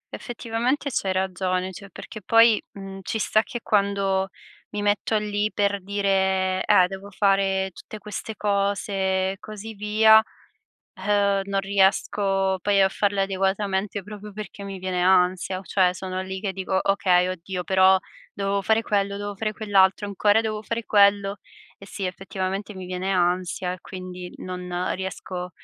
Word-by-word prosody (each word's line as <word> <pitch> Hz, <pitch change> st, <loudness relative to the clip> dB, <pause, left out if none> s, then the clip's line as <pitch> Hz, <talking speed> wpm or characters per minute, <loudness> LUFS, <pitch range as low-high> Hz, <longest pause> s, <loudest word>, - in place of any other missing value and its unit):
Effettivamente 240 Hz, +4 st, -2 dB
c'hai 195 Hz, -5 st, -1 dB
ragione, 185 Hz, 0 st, -1 dB
cioè, 200 Hz, +2 st, -11 dB
perché 215 Hz, +2 st, -10 dB
poi, 230 Hz, +2 st, +5 dB
mhmm, 195 Hz, -1 st, -8 dB
ci 205 Hz, -, -3 dB
sta 215 Hz, +1 st, +2 dB
che 240 Hz, +1 st, -7 dB
quando 200 Hz, -2 st, +1 dB, 0.4 s
mi 205 Hz, 0 st, -4 dB
metto 205 Hz, +1 st, +1 dB
lì 210 Hz, 0 st, -1 dB
per 200 Hz, -1 st, 0 dB
dire: 190 Hz, -1 st, +1 dB
"Eh, 205 Hz, -4 st, +6 dB
devo 195 Hz, +2 st, -8 dB
fare 195 Hz, -1 st, +1 dB
tutte 215 Hz, -, -10 dB
queste 210 Hz, +1 st, -6 dB
cose" 200 Hz, 0 st, 0 dB, 0.4 s
e 195 Hz, -, -8 dB
così 215 Hz, +1 st, -8 dB
via, 220 Hz, +1 st, +5 dB, 0.9 s
uhm, 200 Hz, -1 st, +2 dB
non 195 Hz, 0 st, -1 dB
riesco 195 Hz, 0 st, +1 dB
poi 200 Hz, -1 st, +3 dB
a 190 Hz, -, +5 dB
farle 200 Hz, 0 st, 0 dB
adeguatamente, 195 Hz, +1 st, -1 dB
proprio 210 Hz, +1 st, -10 dB
perché 200 Hz, -1 st, -8 dB
mi 195 Hz, -1 st, -6 dB
viene 185 Hz, -1 st, -2 dB
ansia, 185 Hz, 0 st, +3 dB
o 190 Hz, -, -11 dB
cioè 185 Hz, -2 st, +2 dB
sono 185 Hz, 0 st, -4 dB
lì 190 Hz, 0 st, -5 dB
che 195 Hz, -2 st, -3 dB
dico: 190 Hz, 0 st, -1 dB
"Okay, 185 Hz, -2 st, +3 dB
oddio, 185 Hz, 0 st, -4 dB
però 190 Hz, +1 st, +5 dB, 0.3 s
dovevo 200 Hz, 0 st, -1 dB
fare 220 Hz, +3 st, +3 dB
quello, 200 Hz, -2 st, -1 dB
dovevo 205 Hz, 0 st, -4 dB
fare 215 Hz, +1 st, -2 dB
quell'altro, 200 Hz, -2 st, +2 dB
ancora 205 Hz, +2 st, +3 dB
devo 215 Hz, -1 st, -3 dB
fare 230 Hz, +2 st, -3 dB
quello." 200 Hz, -1 st, +4 dB, 0.4 s
E, -, -, -13 dB
sì, 195 Hz, -1 st, -5 dB
effettivamente 195 Hz, +2 st, -4 dB
mi 185 Hz, -1 st, -7 dB
viene 185 Hz, +1 st, -3 dB
ansia, 180 Hz, 0 st, 0 dB
e 185 Hz, -, -13 dB
quindi 180 Hz, -1 st, -8 dB
non 180 Hz, 0 st, -3 dB
riesco 185 Hz, -1 st, -5 dB
195 Hz, 155 wpm, -24 LUFS, 190-205 Hz, 0.9 s, Eh